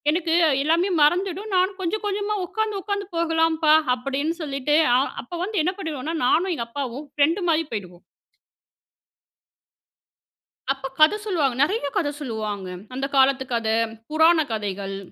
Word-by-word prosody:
எனக்கு 330 +1 -1 0.3
எல்லாமே 335 +6 +2
மறந்துடும் 375 +6 +1
நானும் 375 +1 +1
கொஞ்சம் 420 +5 -2
கொஞ்சமா 410 +1 -1
உட்காந்து 430 +1 -2
உட்காந்து 405 0 -2
போகலாம்ப்பா." 325 -2 +3 0.2
அப்படீன்னு 275 +5 -2
சொல்லிட்டு, 280 0 0 0.2
அ - - +4 0.2
அப்போ 305 +8 -8
வந்து 410 -2 -1
என்ன 365 - 0
பண்ணிடுவோம்னா? 320 -2 -4
நானும் 360 +8 +2
எங்க 235 -7 -4
அப்பாவும் 280 +1 -5
ஃப்ரெண்டு 325 +6 +2
மாரி 325 0 +2
போயிடுவோம். 180 -5 -6 2.7
அப்பா 270 0 -2
கத 310 +6 +7
சொல்வாங்க. 305 - +1
நெறையா 340 -1 +1
கத 335 -7 +1
சொல்லுவாங்க. 215 -7 -4 0.3
அந்த 270 +1 -2
காலத்து 265 0 +4
கத, 230 -1 -1 0.4
புராண 320 +1 +5
கதைகள் 200 -2 -4
310 Hz, 130 wpm, -23 LUFS, 270-365 Hz, 2.7 s, கத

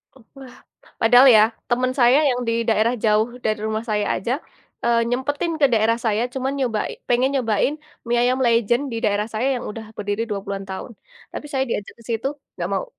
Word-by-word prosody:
Wah, 265 +1 -15 0.5
padahal 245 +4 +7
ya 215 - +7 0.3
temen 255 +1 +1
saya 245 +4 +6
yang 250 -1 0
di 230 - +1
daerah 225 +2 +2
jauh 215 +2 +3 0.2
dari 215 -1 0
rumah 220 +1 -2
saya 210 -1 0
aja, 230 +6 -3 0.5
eee, 235 0 +3
nyempetin 290 +6 -1
ke - - +7
daerah 225 +1 +3
saya 220 +1 +1
cuma 265 0 -2
nyoba 255 -6 -1 0.3
pengen 250 +2 +3
nyobain 245 +1 +1 0.3
mie 240 0 +1
ayam 255 +1 +1
legend 235 +3 +2
di 230 - -3
daerah 210 +1 0
saya 230 +5 0
yang - - -7
udah 220 +1 -8
berdiri 205 +2 -2
20-an 195 -1 -4
tahun, 190 +5 -6 0.4
tapi - - -6
saya 265 -1 +1
diajak 205 -3 -4
ke - - -16
situ 230 +3 -1 0.3
nggak - - -3
mau. - - -1
230 Hz, 185 wpm, -22 LUFS, 215-255 Hz, 0.5 s, padahal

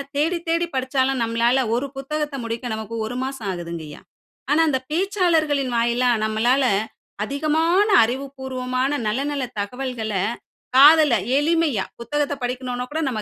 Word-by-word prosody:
தேடி 325 +5 +1
தேடி 335 +1 +1
படிச்சாலும், 260 0 0
நம்மளால 235 +3 +2
ஒரு 265 +4 -1
புத்தகத்த 295 +1 -3
முடிக்க 230 +2 -4
நமக்கு 220 +1 -6
1 235 +3 -5
மாசம் 265 -5 -5
ஆகுதுங்கய்யா. 170 -4 -7 0.5
ஆனா 310 +2 +4
அந்த 265 -3 +1
பேச்சாளர்களின் 320 - +1
வாயிலா 240 +2 +2 0.2
நம்மளால 235 +5 +2 0.6
அதிகமான 320 - +1 0.2
அறிவுபூர்வமான 260 +1 -2 0.2
நல்ல 225 +6 0
நல்ல 280 -2 -2 0.2
தகவல்கள, 230 0 -4 0.6
காதுல 295 +1 +7 0.2
எளிமையா. 305 - +1 0.2
புத்தகத்தை 290 +3 -1
படிக்கனுன்னா 250 0 -3
கூட 315 +2 -2
நம்ம 220 -4 -3
265 Hz, 125 wpm, -22 LUFS, 235-295 Hz, 0.6 s, காதுல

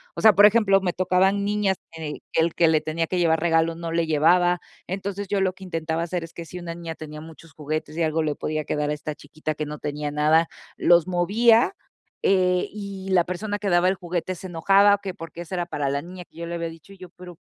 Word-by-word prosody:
O - - -4
sea, 220 -2 +7
por 205 - +8
ejemplo, 210 -2 +4
me 180 - 0
tocaban 185 +2 +2
niñas 205 -2 +1
que 160 -2 -6
el 165 0 +1
que 170 - +4
le 160 -1 +3
tenía 165 +1 -2
que 180 - -1
llevar 165 -2 +3
regalo 165 0 +2
no 165 0 -5
le 165 -1 +1
llevaba. 175 +3 +3 0.3
Entonces, 195 +1 -4
yo 200 - +1
lo 185 -1 +1
que 190 - -14
intentaba 165 -2 -2
hacer 175 0 -3
es 165 - -16
que 170 - -7
si 180 +2 -9
una 170 -1 -6
niña 165 -1 -6
tenía 150 -1 -9
muchos 160 -1 -14
juguetes, 155 +1 -4
y 170 - 0
algo 160 +1 +1
le 150 -2 -1
podía 155 -1 -3
quedar 150 0 -1
a - - 0
esta 150 0 -5
chiquita 155 0 -6
que 150 - -3
no 150 0 -6
tenía 150 0 -4
nada, 155 +3 +3 0.3
los 175 0 +4
movía, 225 - +3 0.5
eh, 180 -2 +2
y 200 -2 -7
la 180 -2 +4
persona 205 +4 -4
que 205 - -2
daba 175 0 +3
el 190 - +2
juguete 180 0 -3
se 185 - -8
enojaba, 195 +4 +4
o 205 - -9
que 190 -2 -5
por 165 -3 -9
qué 170 - -12
esa 175 +2 -6
era 175 -1 -1
para 145 -5 -3
la 140 +1 -1
niña 180 +2 -10
que - - -33
yo 170 - -5
le 170 - -4
había 170 0 -3
dicho 165 +3 -14
yo, 185 -2 -12
pero, 180 -2 -12
170 Hz, 245 wpm, -24 LUFS, 160-190 Hz, 0.5 s, por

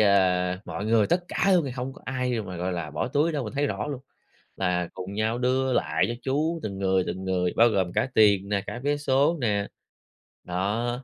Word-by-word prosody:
ơ, 90 -3 +3
mọi 100 - -5
người 110 -2 +4
tất 175 - +1
cả 195 - +2
luôn 175 -4 +4
thì 135 - -3
hông 130 +1 -4
có - - -16
ai 125 -3 -1
mà, 90 -3 -7
gọi 90 +2 -2
là, 85 -3 -4
bỏ 75 - -2
túi 150 +5 +1
đâu, 145 -4 -2
mình 105 - -6
thấy 145 +1 +1
rõ - - -3
luôn 140 -3 -4 0.6
là 90 -2 0
cùng 95 +2 -6
nhau 110 +2 0
đưa 130 +1 +1
lại - - +1
cho 120 - -2
chú 155 +5 0
từng 100 -2 -4
người, 95 -1 +2
từng 95 +1 -4
người, 90 -1 0
bao 115 +1 +6
gồm 95 -5 0
cả 130 - +1
tiền 100 -2 +4
nè, 100 -1 0
cả 120 - -5
vé 145 0 +2
số 145 +3 +2
nè. 105 -4 0 0.8
Đó. 115 +8 -2
110 Hz, 225 wpm, -26 LUFS, 95-130 Hz, 0.8 s, bao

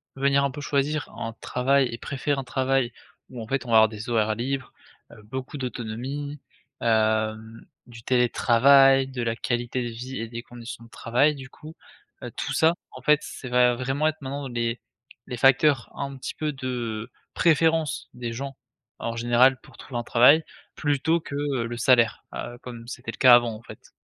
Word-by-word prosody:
venir 140 +1 +2
un 140 - 0
peu 145 - -8
choisir 145 +1 -1
un 115 - -4
travail 135 +1 +2
et 115 - -5
préférer 140 +2 -2
un - - -4
travail 130 -1 0 0.4
où 125 -2 -7
en 110 - -8
fait 135 0 -2
on - - -9
va 110 - +7
avoir 110 0 +6
des 110 +2 -8
horaires 110 -2 +1
libres, 130 +3 -3 0.4
heu, 105 -2 -15
beaucoup 130 +6 -6
d'autonomie, 130 +4 -5 0.4
hem, 110 0 0 0.2
du 115 -1 -12
télétravail, 135 +2 +5
de 130 -2 -5
la 115 -1 -1
qualité 120 +1 -2
de 120 - -3
vie 125 +3 -7
et 115 - -4
des 120 0 -6
conditions 120 -1 -10
de - - -18
travail 130 +7 +1
du 135 -1 -10
coup. 155 +3 -13 0.5
Heu, - - -6
tout - - -3
ça 160 +2 +3 0.2
en 130 - -11
fait 150 +3 +4
c'est 130 - -8
va 125 0 +4
vraiment 135 +5 0
être 155 0 -3
maintenant 140 +1 -5
les 120 -1 -2 0.5
les 125 - -4
facteurs 135 +1 +4
un 140 0 -5
petit 130 - -6
peu 155 -1 -2
de, 120 -4 -4 0.2
préférence 160 -2 +2
des 120 -1 -5
gens 135 +3 -6 0.4
en 115 0 -3
général 120 +3 +4
pour - - -18
trouver 120 -3 -6
un - - -4
travail 125 +7 +5 0.3
plutôt 150 +3 +1
que, 140 - -7
heu, 140 -4 -1
le 120 0 -6
salaire, 120 -2 +3
heu, 120 - -6
comme 120 -2 -9
c'était 120 -1 -6
le - - -13
cas 125 -2 +8
avant 120 -1 +2
en 110 - -11
fait. - - -13
125 Hz, 190 wpm, -25 LUFS, 115-140 Hz, 0.5 s, cas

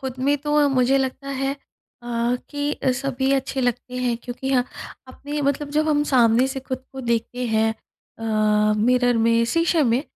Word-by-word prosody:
ख़ुद 260 -1 -6
में 285 +3 +2
तो 295 0 +2
मुझे 265 0 +3
लगता 265 +1 -3
है 270 0 -1
अ, 240 -3 -4
कि 290 0 -2 0.2
सभी 270 -1 -1
अच्छे 270 0 -1
लगते 250 +1 -2
हैं 245 -2 0
क्योंकि 245 +2 -7
यह 250 -2 +2 0.4
अपने 290 +3 -5
मतलब 285 +1 -1
जब 310 +1 +1
हम 295 -1 +3
सामने 240 0 +4
से 270 0 -4
ख़ुद 260 0 -6
को 265 - -6
देखते 240 +1 -2
हैं 220 0 +2 0.5
अ, 215 -1 +2
मिरर 245 +2 +3
में, 230 +1 +3
शीशे 330 +5 +2
में, 245 +1 +2
255 Hz, 170 wpm, -22 LUFS, 235-275 Hz, 0.5 s, सामने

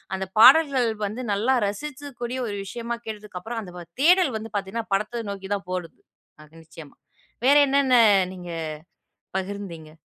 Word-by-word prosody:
அந்த 190 0 -3
பாடல்கள் 265 0 +7 0.2
வந்து 215 +5 -5
நல்லா 220 +6 +1
ரசிக்கக் 275 +5 -6
கூடிய 245 +2 -3
ஒரு 205 - -4
விஷயமா 235 +3 -4
கேட்டதுக்கப்பறம், 215 +1 -6
அந்த 180 -3 -10 0.2
தேடல் 350 -4 +5
வந்து 220 0 -8
பாத்தீங்கன்னா, 205 +3 -3
படத்த 215 +4 -1
நோக்கி 195 0 -8
தான் 195 -2 -8
போயிடுது. 180 -3 -5 0.4
அது 155 - -21
நிச்சயமா. 160 -2 -13 0.5
வேற 280 +2 +6
என்னன்ன 270 -2 +3 0.4
நீங்க 175 -1 -9 0.9
பகிர்ந்தீங்க? 190 -5 -6
215 Hz, 135 wpm, -24 LUFS, 190-255 Hz, 0.9 s, பாடல்கள்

